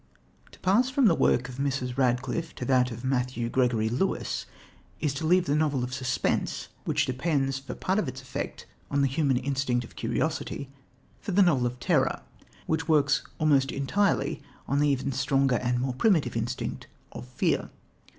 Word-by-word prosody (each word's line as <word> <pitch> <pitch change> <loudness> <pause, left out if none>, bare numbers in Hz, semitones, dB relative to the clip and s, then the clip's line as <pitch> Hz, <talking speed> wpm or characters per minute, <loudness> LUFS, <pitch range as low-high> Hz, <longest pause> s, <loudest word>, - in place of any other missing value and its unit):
To - - -17
pass 215 +8 +3
from 265 0 +2
the 190 - +6
work 125 -5 +2
of 130 -1 -9
Mrs. 135 -3 -1
Radcliffe 130 +5 0
to 125 - -5
that 125 -1 +3
of 120 0 -8
Matthew 125 -2 -1
Gregory 120 -4 +2
Lewis 125 +12 -1 0.5
is 150 -4 0
to 155 +3 -3
leave 180 +1 +4
"the 140 - 0
novel 150 -4 +1
of 125 +1 -4
suspense," 130 0 -1 0.2
which - - +1
depends 135 0 0
for 135 -2 -7
part 190 +3 0
of 180 - -1
its 130 0 -5
effect 130 -1 -6 0.2
on 140 0 +1
the - - +4
human 135 -1 +1
instinct 130 -2 0
of - - -16
curiosity, 140 +2 -2 0.5
for 200 - -4
"the 200 +2 +6
novel 135 -9 +3
of 125 +1 -6
terror," - - +1 0.4
which 160 0 -1
works 145 -3 +3 0.2
almost 140 -3 +3
entirely 190 +9 0 0.3
on 140 - +1
the 145 0 +3
even 140 0 0
stronger 135 -1 +2
and 125 0 0
more 130 0 -1
primitive 150 - +2
instinct 115 +2 -3 0.2
of 60 - -8
fear. 65 - 0
135 Hz, 175 wpm, -27 LUFS, 125-155 Hz, 0.5 s, the